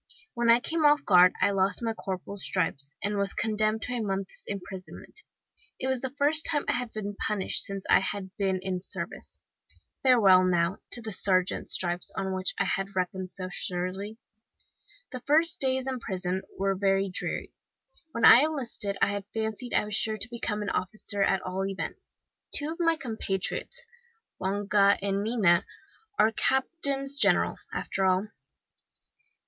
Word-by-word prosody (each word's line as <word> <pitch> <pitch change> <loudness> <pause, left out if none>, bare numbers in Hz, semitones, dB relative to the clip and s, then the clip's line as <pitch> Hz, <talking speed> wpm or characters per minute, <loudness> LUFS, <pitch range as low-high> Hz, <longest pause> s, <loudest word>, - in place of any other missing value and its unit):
When 235 -1 0
I 230 +1 +7
came 320 +5 -1
off 295 0 +4
guard 180 -2 +7
I 200 - +4
lost 195 +2 +1
my 225 -1 0
corporal's 190 -1 -5
stripes, 150 -6 -2
and 205 0 0
was 200 0 0
condemned 215 0 0
to 250 - -3
a 240 - -1
month's 195 -2 -3
imprisonment. 190 -2 -7 0.6
It - - -4
was 260 -2 0
the 265 - -2
first 300 +3 +3
time 295 -3 +1
I - - +3
had 245 -1 -2
been 205 -1 -5
punished 210 -3 +1
since 195 -1 -5
I - - +6
had 190 0 -4
been 195 -2 0
in 190 -1 -2
the - - -8
service. - - -7 0.6
Farewell, 205 -8 +6
now, 175 +1 +1 0.2
to 240 - 0
the 220 - -5
sergeant's 185 -1 0
stripes, 175 0 -1
on 190 0 -2
which 185 0 0
I - - +1
had 195 +1 -2
reckoned 185 0 -2
so 185 0 -6
surely! 185 +5 -3 0.9
"The 255 - -5
first 310 +6 +2
days 260 -1 +1
in 260 -1 -3
prison 185 -3 -3 0.2
were 195 0 +1
very 195 0 +1
dreary. 185 - -3 0.6
When 230 -4 +1
I - - +10
enlisted 255 -9 -2
I - - +4
had 200 -1 -3
fancied 220 +2 -3
I - - +3
was 210 - -6
sure 215 +2 +1
to 220 +2 -1
become 215 -3 -3
an 205 - -2
officer, 200 +2 -2
at 195 -1 +2
all 185 +1 -3
events. 195 0 -6 0.4
Two 295 +2 +1
of 330 - -8
my 330 -1 +3
compatriots, 225 - -3 0.5
Longa 200 +1 +3
and 195 0 -1
Mina, 205 -6 +3 0.5
are 220 - +4
captains 275 +2 0
general, - - +4
after 195 - -2
all. 190 +2 +2
200 Hz, 165 wpm, -28 LUFS, 190-240 Hz, 0.9 s, I